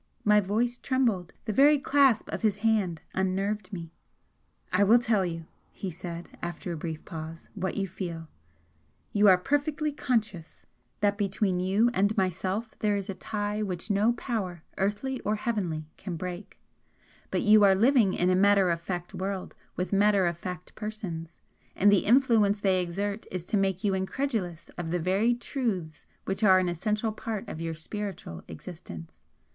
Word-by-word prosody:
My 210 0 +6
voice 225 +5 0
trembled 230 -10 0
the 215 - -1
very 290 +6 +6
clasp 275 -4 +3
of - - -3
his 215 -3 +2
hand 195 -7 +2
unnerved 195 +3 -1
me. 170 -4 -7 0.8
"I 185 +2 +4
will 220 +4 +7
tell 220 -4 +2
you," 165 -2 -4 0.3
he 190 - -5
said, 170 0 -8
after 175 +1 -4
a - - -2
brief 160 0 -5
pause, 165 -1 -8
"what 190 -1 -3
you 195 -1 0
feel. 170 -3 -6 0.9
You 210 0 +5
are 185 -2 +8
perfectly 290 - 0
conscious 215 - -2 0.4
that 205 0 +2
between 195 -2 0
you 200 +6 +2
and 205 +2 +1
myself 190 +4 -1
there 210 -1 +2
is 200 0 -3
a - - -5
tie 210 +2 -3
which 190 0 -3
no 210 +4 +3
power, 195 -9 -4 0.2
earthly 210 +7 -1
or 210 +1 -1
heavenly, 185 -9 -2
can 185 -3 -5
break, 180 +3 -7 0.7
but - - 0
you 215 -1 +7
are 195 -1 +6
living 225 -2 +4
in 180 +1 +2
a - - +4
matter 195 -1 +4
of 170 0 -1
fact 175 0 -5
world 190 0 -4 0.2
with 180 +2 -3
matter 200 -1 +4
of 170 -1 0
fact 180 0 -7
persons, 185 -7 -6 0.3
and 205 +2 +5
the 200 - +3
influence 220 -4 +4
they 190 -2 +2
exert 200 +4 -3
is 180 -2 -5
to - - -1
make 195 -2 +1
you 200 -2 +2
incredulous 190 - -2
of 165 -2 -3
the 175 - 0
very 195 +8 +2
truths 215 - -3 0.2
which 195 +3 -2
are 190 -3 +7
an 185 -1 +2
essential 210 +6 -1
part 215 -1 -5
of 160 - -6
your 165 -1 -3
spiritual 165 - -6
existence. 85 - -10
195 Hz, 170 wpm, -28 LUFS, 180-215 Hz, 0.9 s, are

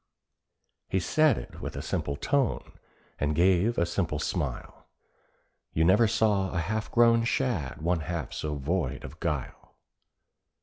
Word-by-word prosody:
He 95 - +1
said 155 - +3
it - - -8
with - - -5
a - - -5
simple 70 - -2
tone, 135 - -1 0.5
and 75 +1 0
gave 95 +6 +3
a 85 - +3
simple 85 -3 -1
smile— - - -4 0.9
You 80 - +2
never 100 +7 +5
saw 105 -4 +2
a 85 - -3
half 105 +7 -2
grown 115 -1 +5
shad 110 - -1
one 85 0 +1
half 85 -1 -4
so 75 -1 -3
void 75 0 -2
of 75 +5 -10
guile. 75 -6 -4
90 Hz, 140 wpm, -28 LUFS, 80-110 Hz, 0.9 s, never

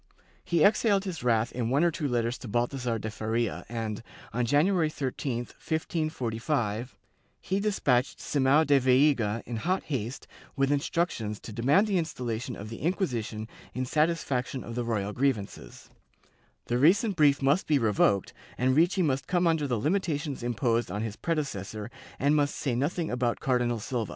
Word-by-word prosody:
He 170 -3 +2
exhaled 205 -1 +4
his 175 -8 -5
wrath 115 -1 +2
in 115 -2 -2
one 140 +5 +3
or 175 - +4
two 155 -3 -2
letters 120 -1 -1
to - - -8
Bal 120 +3 +1
thasar 125 -4 -3
de 110 +1 -4
Faria 110 +1 -2
and, 115 -3 -3 0.3
on 120 0 0
January 160 - +3
13, 135 -3 -3
1545, 125 - -2 0.4
he 190 +1 -1
despatched 145 -12 +1
Simao 145 +2 +3
da 140 -1 +5
Veiga 125 -4 +3
in 120 - -4
hot 185 - 0
haste 130 -4 -4 0.3
with 135 -1 +1
instructions 145 -8 -1
to 110 - -8
demand 135 - +3
the 200 -4 +1
installa 125 -8 -3
tion 125 -1 -5
of 105 +2 -8
the 115 - -7
Inquisition 120 - -2 0.3
in 130 +1 -1
satisfaction 140 -4 0
of 115 - -7
the 120 +1 -2
royal 105 -3 -2
grievances; 110 - -3 0.7
the 120 - 0
recent 195 - +4
brief 145 -3 +4
must 140 +7 +2
be 150 - +4
revoked, 105 -4 +2 0.2
and 130 +1 +2
Ricci 175 +4 +3
must 135 -4 0
come 175 0 +1
under 160 -3 +2
the 125 -3 0
limitations 150 - -1
imposed 120 -1 0
on 100 +4 -3
his 110 -2 -4
predecessor 115 - -3 0.3
and 145 +2 +2
must 145 -1 +1
say 130 - -1
nothing 155 +7 -1
about 125 -1 0
Cardinal 125 -2 +1
Silva. 115 0 -3
130 Hz, 165 wpm, -28 LUFS, 115-155 Hz, 0.7 s, da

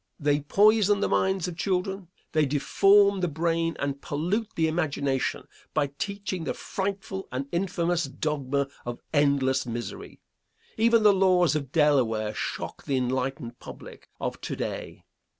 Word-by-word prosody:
They 145 -1 +2
poison 205 +6 +4
the - - +1
minds 190 -2 +1
of 175 - -5
children; 190 +1 -2 0.2
they 155 -2 +2
deform 195 +8 +4
the 180 - +1
brain 165 +1 0
and 140 0 -3
pollute 180 +10 -1
the 160 -1 +2
imagination 140 -5 -1 0.3
by 145 -3 +1
teaching 200 -3 -3
the - - -3
frightful 195 0 -4
and 130 +2 -3
infamous 175 -1 0
dogma 140 0 -2 0.2
of 120 0 -5
endless 140 -3 +2
misery. 120 0 -6 0.6
Even 230 0 +4
the 210 -1 +7
laws 185 -4 +3
of 140 -4 -3
Delaware 125 -9 +2
shock - - -5
the 135 - 0
enlightened 130 -1 -2
public - - -11
of - - -4
to - - -4
day. - - -5
160 Hz, 140 wpm, -27 LUFS, 140-190 Hz, 0.6 s, the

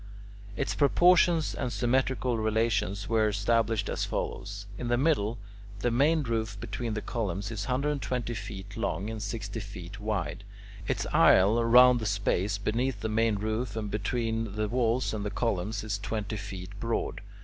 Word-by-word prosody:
Its 135 - -1
proportions 170 +2 +4
and 125 - -3
symmetrical 130 0 +1
relations 110 -2 0
were 110 -2 +3
established 110 +1 +1
as - - -2
follows. 100 0 -4
In 120 - -3
the 120 0 +2
middle, 120 -6 +1 0.4
the 120 - +1
main 150 +6 +3
roof 110 -4 -2
between 115 -1 -4
the 110 - -3
columns 100 -3 -3
is 105 -3 -4
120 130 -2 -1
feet 100 -2 -7
long 110 -2 -2
and 110 -1 -5
sixty 105 +1 -4
feet 100 -2 -8
wide. 100 -4 -3 0.4
Its - - -1
aisle 110 +5 +5
round 125 +1 +7
the 110 - -2
space 100 0 0
beneath 110 +2 -1
the 110 - -2
main 110 0 +2
roof 110 +2 -2
and 105 -2 -3
between 115 0 -2
the 105 0 0
walls 120 +1 +1
and 105 -2 -3
the 105 - -2
columns 105 -2 -1
is 105 -2 -2
twenty 110 +1 -3
feet 95 -3 -6
broad. 115 +1 -2
110 Hz, 160 wpm, -29 LUFS, 100-120 Hz, 0.4 s, round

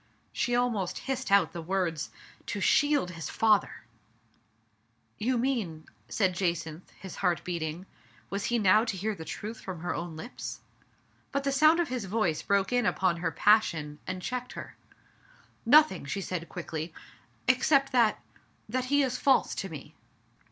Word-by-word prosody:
she 245 0 0
almost 235 -7 0
hissed 265 -2 -2
out 200 -3 +5
the 170 - -5
words 165 -3 -1 0.2
— - - -24
''to 205 - -3
shield 290 -2 +3
his 165 -2 -6
father! 215 - +2 1.4
"You 250 +3 +1
mean 225 -11 -1
*' - - -36
said 190 -4 +1
Jacynth, 170 -2 -2
his 190 - -9
heart 180 -3 0
beat 175 -2 -3
ing; 160 +4 -4 0.5
was 200 0 -2
he 240 - +1
now 210 0 +5
to 220 -5 -3
hear 215 +4 -1
the 165 - -8
truth 215 +7 -6
from 180 -4 -7
her 175 - -2
own 170 -1 -5
lips? 235 +10 -7 0.7
But 280 0 -1
the 275 - +1
sound 310 +4 +5
of 340 - 0
his 250 -5 -3
voice 190 -6 0
broke 200 +3 +1
in 245 -3 +2
upon 185 -2 +1
her 170 -1 -1
passion, 160 -7 +2
and 185 -1 -4
checked 250 +3 -4
her. - - -8 0.9
"Nothing,'* 290 - +5
said 180 +2 -3
she - - -10
quickly, 165 -1 -5 0.6
"except 275 +2 +3
that 235 -5 +3 0.2
— - - -38
that 255 +3 -1
he 285 +2 +3
is 255 -1 -1
false 270 -2 +3
to 195 - -4
me. 150 -1 -9
200 Hz, 170 wpm, -29 LUFS, 170-245 Hz, 1.4 s, out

